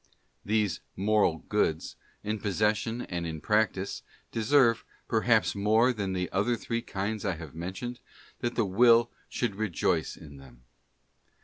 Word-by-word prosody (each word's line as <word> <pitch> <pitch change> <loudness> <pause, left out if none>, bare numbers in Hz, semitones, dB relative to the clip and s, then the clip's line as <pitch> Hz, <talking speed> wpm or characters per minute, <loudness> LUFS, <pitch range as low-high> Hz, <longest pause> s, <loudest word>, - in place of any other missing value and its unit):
These 105 -4 0 0.2
moral 100 -5 +2
goods, 80 -7 0 0.3
in 105 +1 -2
possession 110 +3 0
and 85 -2 -4
in 80 -1 -5
practice, 105 +1 0 0.3
deserve, 115 0 +3 0.2
perhaps - - +3
more 110 +5 +3
than 100 -4 -3
the 90 -1 -1
other 105 +6 +1
three 115 0 -3
kinds 105 -1 -3
I 95 -3 0
have 80 -3 -9
mentioned, 95 +9 -5 0.4
that 120 -1 -2
the 115 - +2
will 115 +4 +5 0.2
should 120 -4 -1
rejoice 105 -6 0
in 70 -3 -12
them. 60 -3 -16
105 Hz, 135 wpm, -29 LUFS, 90-115 Hz, 0.4 s, will